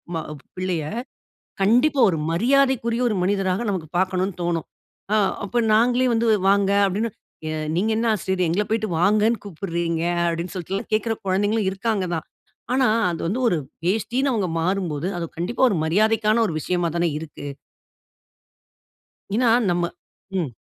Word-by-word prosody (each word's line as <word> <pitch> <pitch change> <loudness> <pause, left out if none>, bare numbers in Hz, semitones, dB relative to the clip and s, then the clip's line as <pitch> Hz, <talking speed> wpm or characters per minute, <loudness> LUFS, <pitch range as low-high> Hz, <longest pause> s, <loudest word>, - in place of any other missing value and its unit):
ம 160 - -2 0.3
பிள்ளைய. 180 -4 -1 0.8
கண்டிப்பா, 255 +8 +4
ஒரு 165 - -2
மரியாதைக்குரிய, 245 +3 +2
ஒரு 215 - -1
மனிதராக 195 +2 0
நமக்கு 175 -5 -3
பார்க்கணும்னு 185 0 0
தோணும். 170 -2 -1 0.5
ஆ - - +4 0.3
அப்ப 240 +3 0
நாங்களே 245 +3 +3
வந்து 230 +1 +1 0.2
வாங்க, 200 0 +3 0.2
அப்டினு, 210 +4 -1 0.4
எ - - -2 0.3
"நீங்க 205 +5 +1
என்ன 230 - 0
ஆசிரியரே! 190 -3 -1
எங்கள 200 +5 +1
போய்ட்டு 220 -2 0
வாங்கனு 215 +3 +3
கூப்பிட்றீங்க?" 170 -3 -3 0.3
அப்டின்னு 170 +2 -3
சொல்ட்டுல்லாம் 185 +2 -4
கேட்கிற 225 +1 +1
குழந்தைங்களும் 205 +2 +1
இருக்காங்கதான். 190 -6 -2 0.5
ஆனா, 260 -1 +3 0.2
அது 165 - -4
வந்து 225 +8 -1
ஒரு 175 - +1 0.3
வேஷ்டின்னு 240 +7 +1
அவுங்க 205 -6 0
மாறும்போது, 175 -3 -1
அது 170 - -3
கண்டிப்பா 185 +10 -2
ஒரு 190 - 0
மரியாதைக்கான 215 +5 +2
ஒரு 165 - -3
விஷயமா 175 +1 0
தானே 170 -1 +1
இருக்கு. 150 -2 -9 1.9
ஏன்னா, 240 +1 +3 0.2
நம்ம 175 0 +1 0.6
ம். 150 - -4
195 Hz, 135 wpm, -23 LUFS, 175-225 Hz, 1.9 s, கண்டிப்பா